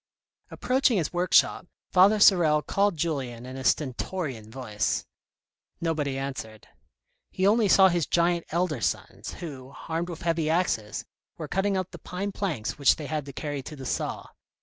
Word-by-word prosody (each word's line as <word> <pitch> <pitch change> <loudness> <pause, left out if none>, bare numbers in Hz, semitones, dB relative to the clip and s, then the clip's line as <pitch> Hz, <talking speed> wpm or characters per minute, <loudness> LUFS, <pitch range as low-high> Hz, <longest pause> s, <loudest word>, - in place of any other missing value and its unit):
Approaching 255 -3 +1
his 165 -3 -1
workshop, 175 0 +3 0.2
Father 195 +4 +5
Sorel 160 -7 +5
called 200 -3 +1
Julien 130 -7 -3
in 130 +1 -8
his 130 -1 -1
stentorian 130 - -2
voice; 110 -4 -2 0.7
nobody 150 -5 -1
answered. 125 -6 -6 0.6
He 185 - -1
only 215 +1 +4
saw 190 0 +7
his 175 -4 0
giant 170 0 +2
elder 165 -6 -1
sons, - - -3
who, 140 -6 -9
armed 165 +2 -2
with 170 - -7
heavy 165 -2 0
axes, 160 -11 0 0.3
were - - -5
cutting 195 +1 0
up 185 -1 -3
the - - -10
pine 195 +3 -4
planks 155 - -3
which 140 - +5
they 155 - -7
had 150 -1 -3
to 140 - -8
carry 145 -1 -4
to 150 +3 -9
the 135 -2 -9
saw. - - -3
160 Hz, 160 wpm, -27 LUFS, 135-185 Hz, 0.7 s, saw